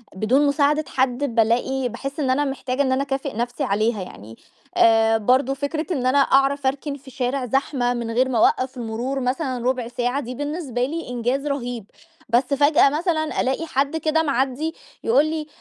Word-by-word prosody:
بدون 255 +9 +2
مساعدة 295 +1 +2
حد، 260 -1 -1
بالاقي 245 +3 +1
باحس 275 +5 -6
إن 275 -3 0
أنا 280 +3 +2
محتاجة 270 -1 -2
إن 265 - +1
أنا 260 +1 +1
اكافئ 270 0 -3
نَفْسي 240 +4 -2
عليها 215 -2 0
يعني. 115 - -10 0.4
آآ، 225 0 +5
برضو 255 +5 +2
فكرة 285 +3 -3
إن 260 -5 -2
أنا 260 +2 +3
أعرف 275 0 +3
اركن 280 +2 -2
في 270 -1 -15
شارع 255 0 -2
زحمة 250 0 0
من 235 -2 -4
غير 255 +3 +2
ما 245 - 0
أوقّف 255 +4 +2
المرور 240 +3 -3
مثلًا 255 -1 -2
ربع 255 -2 0
ساعة، 245 +2 -1
دي 250 -2 -6
بالنسبة 290 -4 -2
لي 325 +3 -5
إنجاز 250 +4 -1
رهيب، 245 -6 -3 0.4
بس 240 +3 +4
فجأة 285 +2 +4
مثلًا 315 +1 -1
ألاقي 265 +5 -1
حد 280 +2 0
كده 320 +1 +1
معدّي 275 +2 -1 0.3
يقول 260 +6 +4
لي: 310 -1 -3
265 Hz, 175 wpm, -22 LUFS, 245-285 Hz, 0.4 s, آآ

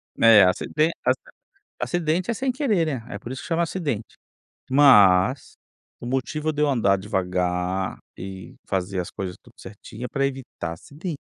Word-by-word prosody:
É, 115 -3 +7
aciden 150 - +1
aci - - +2 0.6
acidente 175 +3 0
é - - 0
sem 260 +3 -1
querer, 220 - +1
né, 130 -7 -3
é 100 - -6
por 120 - -8
isso 130 - -6
que - - -9
chama 170 -1 +1
acidente. 150 - -3 0.6
Mas 125 -4 +5 0.4
o - - -7
motivo 135 +5 -1
de 150 0 -1
eu 150 - +3
andar 115 -8 +3
devagar 90 -1 -1 0.2
e 95 -1 -8
fazer 95 0 -1
as 90 - -5
coisas 95 -1 -5
tudo 120 -2 -20
certinha 110 +2 -10
é - - -10
pra 140 +2 -1
evitar 130 -11 -5
acidente. 150 - -7
120 Hz, 165 wpm, -24 LUFS, 95-155 Hz, 0.6 s, É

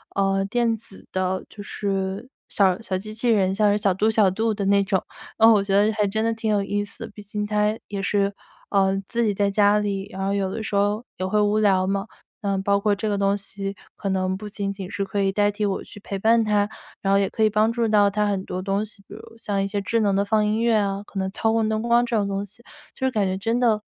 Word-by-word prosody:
嗯， 195 0 +1
电 235 +1 +1
子 210 -3 -10
的 185 0 -1
就 210 - -10
是 195 +2 -3 0.2
小 190 -2 +2
小 195 -5 -2
机 215 +3 -7
器 225 +3 -1
人， 195 -4 +3
像 210 +1 +3
是 205 - +2
小 200 -2 +2
度 210 +4 +1
小 215 -3 +4
度 220 +3 0
的 200 -1 -3
那 200 0 +4
种， 195 -1 0 0.3
哦， 225 +1 +7
我 205 -2 +3
觉 195 -1 0
得 205 +2 +4
还 210 -1 +1
真 220 +3 -1
的 230 - +1
挺 225 0 -3
有 205 -1 +2
意 205 +1 -1
思。 205 - -9
毕 210 - -10
竟 210 +1 -4
他 210 +1 +1
也 200 -1 -3
是， 200 0 +1 0.4
嗯， 195 -1 +2
自 235 0 0
己 210 -2 +1
在 200 0 +1
家 205 +1 +4
里， 200 -1 -2
然 190 0 -4
后 195 - 0
有 195 -1 0
的 220 +3 -4
时 210 - -3
候 205 +3 +1
也 185 - -2
会 210 +3 +1
无 210 +1 +2
聊 195 -3 +3
嘛。 195 0 -1 0.4
嗯， 195 -2 -1
包 200 0 +2
括 205 0 +2
这 215 +2 -2
个 205 - 0
东 200 0 +2
西， 200 0 -6 0.2
可 200 - -5
能 190 0 0
不 210 +2 -8
仅 200 -1 -3
仅 195 -2 -7
是 200 -1 -2
可 200 +1 -2
以 195 - +2
代 205 +1 +2
替 210 +1 -2
我 195 -1 -2
去 - - -12
陪 200 0 -5
伴 225 +4 +4
他， 210 -1 +1 0.3
然 195 0 +1
后 200 - +5
也 195 - +1
可 220 - -1
以 215 - +5
帮 215 +1 +2
助 230 0 0
到 210 -2 +4
他 210 +1 0
很 200 -2 -1
多 185 0 -4
东 195 +2 0
西， 210 -2 -12
比 - - -10
如 - - -9 0.2
像 205 -3 -2
一 195 - 0
些 200 0 -2
智 230 +4 0
能 205 -3 +2
的 200 - +2
放 215 +1 +2
音 215 +2 0
乐 235 0 +3
啊， 200 -1 -1
可 195 - -6
能 190 0 -1
操 220 +2 0
控 225 -1 +1
灯 215 0 0
光 235 +1 +3
这 240 - -2
种 205 -2 +1
东 195 0 -2
西， 210 +4 -16 0.3
就 265 - -2
是 260 - +2
感 210 -4 +1
觉 185 0 -1
真 225 +5 0
的， 225 -4 +2
205 Hz, 290 characters per minute, -23 LUFS, 195-215 Hz, 0.4 s, 哦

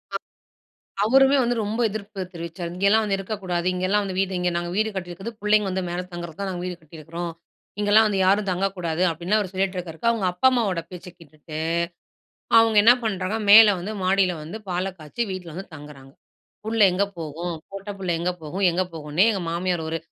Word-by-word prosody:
அ. - - +2 0.9
அவருமே 270 +4 +5
வந்து 240 0 0
ரொம்ப 210 +3 -3
எதிர்ப்பு 200 -1 -6
தெரிவிச்சார். 170 0 -6
"இங்கேலாம் 200 +4 +3
வந்து 200 -2 0
இருக்கக்கூடாது, 185 -3 -3
இங்கேலாம் 190 +3 +1
வந்து 190 -2 -4
வீடு 195 0 0
இங்க 180 0 +1
நாங்க 175 0 -3
வீடு 215 +1 +2
கட்டியிருக்கது 190 +4 -5
புள்ளைங்க 210 0 +3
வந்து 190 0 -2
மேல 175 +1 -2
தங்குறது 170 -2 -7
தான் 200 -1 -2
நாங்க 180 -1 -4
வீடு 180 -1 -4
கட்டியிருக்கிறோம். 165 +2 -7 0.5
இங்கலாம் 210 +2 +5
வந்து 200 -2 -1
யாரும் 200 +1 +3
தங்கக்கூடாது" 180 -2 -1
அப்படின்னு 175 +6 0
அவர் 195 -4 -3
சொல்லிட்டுருக்கிருக்க. 185 -2 -3
அவங்க 225 -5 -1
அப்பா, 180 +9 +3
அம்மாவோட 205 -9 0
பேச்சை 180 0 -9
கேட்டுட்டு, 155 -1 -10 1.0
அவங்க 225 -1 +3
என்ன 235 +3 +8
பண்ணுறாங்க 195 -1 -1
மேல 220 +1 +10
வந்து 200 +5 -5
மாடியில 185 0 +3
வந்து 165 +8 -7
பாலை 180 +1 -1
காய்ச்சி 155 +10 -3
வீட்ல 185 -2 -6
வந்து 190 +4 -7
தங்குறாங்க. 145 -3 -12 0.5
புள்ளை 220 -1 +3
எங்க 190 +3 +2
போகும்? 165 +2 -4 0.2
பொட்ட 195 +1 -7
புள்ள 185 -2 -3
எங்க 175 +1 0
போகும்? 175 +6 -4
எங்க 175 +2 0
போகும்னே 155 +3 +1
எங்க 195 - -2
மாமியார் 175 0 -1
ஒரு 165 +1 -2
185 Hz, 180 wpm, -24 LUFS, 170-205 Hz, 1.0 s, மேல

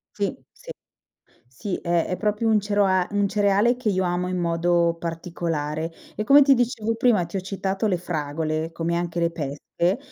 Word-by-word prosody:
Sì, - - -1
sì. - - -13 0.8
Sì 175 +10 -5
è 170 -1 0
è 180 - -3
proprio 210 +2 0
un 215 - +4
cerua 200 -3 +2 0.2
cereale 205 +4 +2
che 240 -4 -1
io 190 -1 +1
amo 175 0 -1
in 185 0 -2
modo 170 0 +1
particolare 165 -2 -3 0.2
e 215 - -2
come 280 +6 +7
ti 275 0 +6
dicevo 230 -2 0
prima, 225 -6 +3
ti 170 +4 -5
ho - - 0
citato 195 +2 -2
le 185 - +1
fragole, 155 -1 -3
come 165 +1 -2
anche 170 0 -2
le 170 0 +1
pesche, 165 - -2
180 Hz, 170 wpm, -24 LUFS, 165-205 Hz, 0.8 s, come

